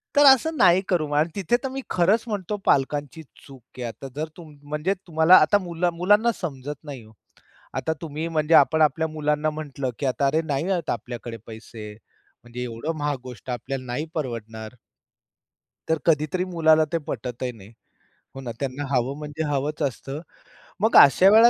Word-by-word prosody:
तर 290 Hz, 0 st, +6 dB
असं 280 Hz, +4 st, +6 dB
नाही 180 Hz, 0 st, +5 dB
करू 165 Hz, -5 st, +1 dB
आणि 155 Hz, +3 st, +2 dB
तिथे 200 Hz, +5 st, +1 dB
तर -, -, -1 dB
मी 270 Hz, +1 st, -5 dB
खरंच 190 Hz, +6 st, +2 dB
म्हणतो 205 Hz, -1 st, -3 dB
पालकांची 145 Hz, +3 st, +1 dB, 0.2 s
चूक 135 Hz, -2 st, -14 dB, 0.2 s
आहे. 125 Hz, -, -5 dB
आता 135 Hz, +4 st, -8 dB
जर 155 Hz, +2 st, -3 dB
तुम 160 Hz, -3 st, -12 dB, 0.2 s
म्हणजे 150 Hz, +6 st, 0 dB
तुम्हाला 160 Hz, +2 st, +6 dB
आता 180 Hz, +7 st, +4 dB
मुला 175 Hz, -2 st, -1 dB
मुलांना 205 Hz, +7 st, +3 dB
समजत 145 Hz, -3 st, -6 dB
नाही 140 Hz, -6 st, -8 dB
ओ. 110 Hz, -, -17 dB, 0.6 s
आता 160 Hz, -, -1 dB
तुम्ही 160 Hz, 0 st, -4 dB
म्हणजे 160 Hz, -1 st, 0 dB
आपण 160 Hz, 0 st, +5 dB
आपल्या 155 Hz, +1 st, +3 dB
मुलांना 150 Hz, 0 st, 0 dB
म्हटलं, 145 Hz, -3 st, -4 dB
की -, -, -2 dB
"आता 135 Hz, +2 st, 0 dB
अरे 155 Hz, +4 st, +2 dB
नाही 150 Hz, +4 st, -1 dB
आहेत 175 Hz, -3 st, -1 dB
आपल्याकडे 120 Hz, -1 st, -5 dB
पैसे. 110 Hz, -1 st, -9 dB, 0.5 s
म्हणजे 120 Hz, +1 st, -7 dB
एवढं 125 Hz, +7 st, -4 dB
महाग 145 Hz, -1 st, -1 dB
गोष्ट 125 Hz, -1 st, -10 dB
आपल्याला 130 Hz, +2 st, -4 dB
नाही 125 Hz, +5 st, -3 dB
परवडणार." 115 Hz, -5 st, -5 dB, 1.1 s
तर 160 Hz, -, +3 dB
कधीतरी 160 Hz, +3 st, +2 dB
मुलाला 160 Hz, -3 st, +3 dB
ते 165 Hz, -, +3 dB
पटतही 125 Hz, -3 st, -4 dB
नाही. 110 Hz, -2 st, -15 dB, 0.6 s
हो 135 Hz, -, -7 dB
ना, 125 Hz, -3 st, -5 dB
त्यांना 140 Hz, +1 st, -3 dB
हवं 130 Hz, +1 st, 0 dB
म्हणजे 150 Hz, +1 st, -5 dB
हवंच 145 Hz, +2 st, -2 dB
असतं. 135 Hz, +1 st, -3 dB, 0.6 s
मग 220 Hz, +2 st, +2 dB
अशा 180 Hz, +7 st, +8 dB
वेळेला 225 Hz, +3 st, +8 dB
150 Hz, 170 wpm, -24 LUFS, 130-170 Hz, 1.1 s, अशा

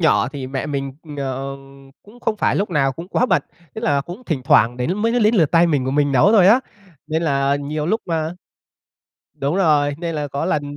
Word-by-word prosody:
nhỏ 160 Hz, -, +3 dB
thì 135 Hz, -3 st, -6 dB
mẹ 135 Hz, +2 st, -4 dB
mình, 140 Hz, -2 st, -3 dB, 0.3 s
ờm, 135 Hz, 0 st, -6 dB
cũng 230 Hz, +4 st, -18 dB
không 215 Hz, -2 st, -1 dB
phải -, -, +1 dB
lúc 200 Hz, -1 st, -1 dB
nào 135 Hz, -4 st, +1 dB
cũng 170 Hz, +7 st, -9 dB
quá 250 Hz, -, +1 dB
bận, -, -, +2 dB, 0.3 s
tức 220 Hz, -, -6 dB
là 145 Hz, -2 st, +2 dB
cũng 175 Hz, -, -9 dB
thỉnh 140 Hz, -7 st, -2 dB
thoảng 120 Hz, -1 st, +4 dB
đến 145 Hz, +10 st, -1 dB
mới 230 Hz, +2 st, +1 dB
đến 215 Hz, +2 st, +3 dB
lượt 160 Hz, -8 st, +3 dB
tay 170 Hz, 0 st, +4 dB
mình 145 Hz, -6 st, 0 dB
của 130 Hz, -, -1 dB
mình 145 Hz, 0 st, +1 dB
nấu 165 Hz, -, +4 dB
thôi 190 Hz, -4 st, +6 dB
á. 235 Hz, +6 st, +6 dB, 0.5 s
Nên 160 Hz, +1 st, -1 dB
là 140 Hz, -2 st, +1 dB
nhiều 150 Hz, +2 st, -4 dB
lúc 220 Hz, +5 st, 0 dB
a, 160 Hz, -2 st, -1 dB, 1.1 s
đúng 140 Hz, +5 st, -1 dB
rồi, 150 Hz, -6 st, +2 dB
nên 165 Hz, -2 st, -4 dB
là 145 Hz, -1 st, -2 dB
có 140 Hz, 0 st, -3 dB
lần 150 Hz, -1 st, 0 dB
150 Hz, 225 wpm, -20 LUFS, 135-175 Hz, 1.1 s, thôi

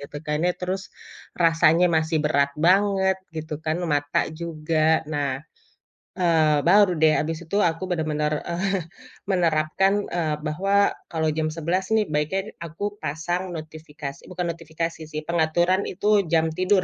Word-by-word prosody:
gitu 140 Hz, +1 st, -9 dB
kan 150 Hz, 0 st, 0 dB
ya, 180 Hz, -, +2 dB
terus 185 Hz, +1 st, -2 dB, 0.6 s
rasanya 165 Hz, +1 st, +5 dB
masih 160 Hz, 0 st, +1 dB
berat 140 Hz, -2 st, +2 dB, 0.2 s
banget 190 Hz, 0 st, +4 dB, 0.2 s
gitu 155 Hz, 0 st, -4 dB
kan, 155 Hz, +1 st, 0 dB, 0.2 s
mata 145 Hz, 0 st, +1 dB, 0.2 s
juga. 160 Hz, -1 st, +1 dB
Nah, 140 Hz, -3 st, -2 dB, 0.8 s
eee, 160 Hz, -4 st, +3 dB
baru 200 Hz, +1 st, +6 dB
deh 155 Hz, -1 st, +6 dB
abis 160 Hz, +1 st, -3 dB
itu 180 Hz, +5 st, -2 dB
aku 165 Hz, +3 st, -5 dB
bener-bener, 155 Hz, -2 st, 0 dB, 0.2 s
eee, 190 Hz, +2 st, -1 dB, 0.5 s
menerapkan, 175 Hz, +1 st, +2 dB, 0.2 s
eee, 155 Hz, -3 st, 0 dB
bahwa 195 Hz, +6 st, 0 dB, 0.4 s
kalau 160 Hz, -1 st, 0 dB
jam 155 Hz, 0 st, 0 dB
11 170 Hz, +4 st, -1 dB
nih 215 Hz, -1 st, +3 dB
baiknya 150 Hz, +6 st, 0 dB, 0.2 s
aku 165 Hz, +4 st, -8 dB, 0.2 s
pasang 175 Hz, +5 st, -2 dB
notifikasi 150 Hz, -3 st, -8 dB
bukan 180 Hz, -1 st, -2 dB
notifikasi 165 Hz, 0 st, -5 dB
sih, 155 Hz, 0 st, -3 dB
pengaturan 175 Hz, +3 st, +2 dB
itu 205 Hz, +3 st, -3 dB, 0.2 s
jam 160 Hz, -1 st, +4 dB
tidur 185 Hz, +1 st, +3 dB
165 Hz, 140 wpm, -24 LUFS, 155-180 Hz, 0.8 s, baru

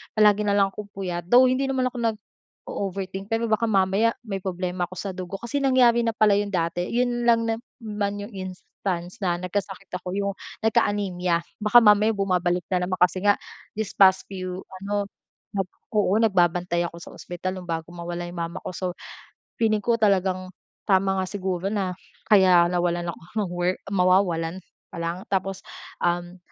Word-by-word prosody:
palagi 210 Hz, -1 st, +4 dB
na 200 Hz, -, +3 dB
lang 195 Hz, -1 st, +3 dB
akong 210 Hz, +1 st, -8 dB
puyat, 175 Hz, -3 st, -4 dB
though 245 Hz, +7 st, +7 dB
hindi 270 Hz, +1 st, +1 dB
naman 260 Hz, -1 st, 0 dB
ako 245 Hz, -, -7 dB
nag-o-overthink 195 Hz, -3 st, -5 dB
pero 225 Hz, +1 st, 0 dB
baka 220 Hz, +2 st, +2 dB
mamaya 200 Hz, +2 st, +2 dB
may 200 Hz, -4 st, -4 dB
problema 180 Hz, -1 st, -3 dB
ako 185 Hz, -, -11 dB
sa 195 Hz, +2 st, -4 dB
dugo 185 Hz, +1 st, -6 dB
kasi 235 Hz, +7 st, -3 dB
nangyari 255 Hz, -3 st, +4 dB
na 230 Hz, -1 st, 0 dB
pala 215 Hz, -1 st, +4 dB
'yon 205 Hz, -, -1 dB
dati. 175 Hz, -2 st, -1 dB
'Yon 240 Hz, 0 st, 0 dB
lang 230 Hz, -1 st, +5 dB
naman 220 Hz, -2 st, -3 dB
'yong 205 Hz, -, -9 dB
instance 185 Hz, 0 st, -5 dB
na 180 Hz, -4 st, +1 dB
nagkasakit 190 Hz, +2 st, -4 dB
ako, 180 Hz, 0 st, -5 dB
'yong 200 Hz, 0 st, 0 dB, 0.3 s
nagka-anemia. 185 Hz, -5 st, +1 dB, 0.2 s
Baka 215 Hz, +3 st, +6 dB
mamaya 210 Hz, +1 st, +5 dB
bumabalik 180 Hz, -2 st, +1 dB
na 180 Hz, -1 st, +1 dB
naman 185 Hz, -, -1 dB
kasi 180 Hz, +1 st, +2 dB
nga 205 Hz, +1 st, +4 dB, 0.4 s
this 215 Hz, -1 st, -3 dB
past 190 Hz, -1 st, +5 dB
few 185 Hz, -1 st, -5 dB, 0.2 s
ano, 205 Hz, 0 st, 0 dB, 0.9 s
oo 210 Hz, -3 st, +2 dB
nagbabantay 175 Hz, -4 st, +2 dB
ako 170 Hz, -, -11 dB
sa -, -, -11 dB
ospital 185 Hz, +1 st, -5 dB
nung 180 Hz, -, -11 dB
bago 165 Hz, 0 st, -4 dB
mawala 175 Hz, 0 st, -5 dB
'yong 175 Hz, 0 st, -7 dB
mama 170 Hz, 0 st, -4 dB
ko, -, -, -4 dB
so 185 Hz, -, -5 dB, 0.8 s
feeling 215 Hz, -2 st, +2 dB
ko 235 Hz, -1 st, +2 dB
talagang 190 Hz, -3 st, +2 dB, 0.4 s
tama 190 Hz, 0 st, +3 dB
nga 185 Hz, -, -1 dB
siguro 185 Hz, -2 st, -3 dB
na 195 Hz, -3 st, -1 dB, 0.4 s
kaya 185 Hz, -4 st, +7 dB
nawalan 175 Hz, -1 st, 0 dB
ako 165 Hz, -, -12 dB, 0.2 s
ng 180 Hz, -, -6 dB
work 175 Hz, +1 st, 0 dB
mawawalan 180 Hz, -3 st, +2 dB, 0.3 s
pa -, -, -8 dB
lang. 170 Hz, +2 st, -3 dB
Tapos, 195 Hz, 0 st, -1 dB, 0.4 s
um, 175 Hz, +1 st, -1 dB
190 Hz, 165 wpm, -25 LUFS, 180-210 Hz, 0.9 s, though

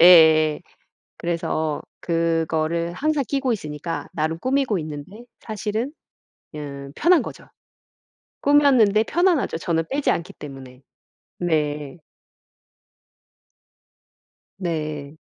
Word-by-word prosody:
예예. 160 Hz, -3 st, +7 dB, 0.6 s
그래서 160 Hz, -3 st, -1 dB, 0.2 s
그거를 165 Hz, 0 st, 0 dB
항상 295 Hz, -, 0 dB
끼고 275 Hz, -2 st, 0 dB
있으니까 155 Hz, -4 st, -4 dB
나름 160 Hz, +1 st, -1 dB
꾸미고 260 Hz, -5 st, +1 dB
있는데 155 Hz, +10 st, -8 dB, 0.2 s
사실은 215 Hz, +4 st, -3 dB, 0.7 s
음 140 Hz, -2 st, -7 dB
편한 345 Hz, +1 st, +5 dB
거죠. -, -, -8 dB, 1.0 s
꾸몄는데 260 Hz, -8 st, +5 dB
편안하죠 345 Hz, -, +2 dB
저는 165 Hz, -1 st, 0 dB
빼지 280 Hz, +1 st, +1 dB
않기 170 Hz, -, -4 dB
때문에. 135 Hz, -3 st, -10 dB, 0.6 s
네. 150 Hz, -3 st, -1 dB, 2.6 s
네. 155 Hz, -5 st, -3 dB
170 Hz, 200 characters per minute, -23 LUFS, 155-225 Hz, 2.6 s, 예예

